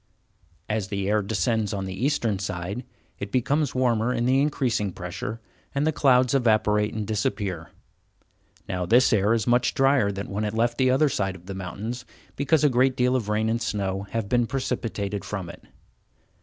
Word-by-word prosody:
As 105 -2 -1
the 100 -1 -2
air 105 +1 +2
descends 105 +2 0
on 95 -1 -3
the 95 - -5
eastern 115 -2 0
side 100 +4 -4 0.4
it 100 0 -5
becomes 140 +5 +1
warmer 120 -2 +2
in 120 -1 0
the 130 +2 +3
increasing 125 -8 0
pressure, 90 +6 -6 0.4
and 140 +2 +1
the 160 - +3
clouds 130 -4 +3
evaporate 110 -4 +2
and 110 -1 -2
disappear. 100 -5 -2 1.0
Now 90 -1 -2
this 125 +4 +5
air 105 0 +3
is 110 - -1
much 120 0 +2
drier 135 -7 +3
than 100 0 -5
when 105 +2 -2
it 105 0 -2
left 120 +2 +1
the 130 -1 +4
other 135 +4 +4
side 95 -8 -1
of 90 -1 -14
the 95 - -6
mountains, 105 +6 -5 0.3
because 150 +2 +2
a - - +7
great 130 0 +3
deal 125 +1 +2
of 115 -5 -1
rain 110 +1 +1
and 115 +1 0
snow 100 -2 -2
have 115 -3 -2
been 120 +1 +2
precipitated 110 -6 -3
from 95 -4 -5
it. - - -15
110 Hz, 185 wpm, -25 LUFS, 100-125 Hz, 1.0 s, a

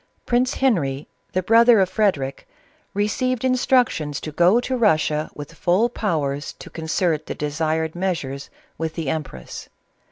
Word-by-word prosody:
Prince 250 +1 +1
Henry, 155 - 0 0.3
the 185 - 0
brother 230 +2 +6
of 190 - +4
Frederic, 185 -9 -1 0.5
received 245 +5 0
instructions 245 - +2
to 155 - -6
go 175 +9 +4
to 255 +1 -2
Russia 155 -9 +2
with 145 +2 -8
full 185 +8 +2
powers 150 - -2
to - - -12
concert 160 0 -1
the - - -4
desired 155 +2 -1
measures 155 -7 -3 0.3
with 160 -1 -3
the 160 -5 -3
empress. 135 - -6
170 Hz, 135 wpm, -22 LUFS, 150-225 Hz, 0.5 s, brother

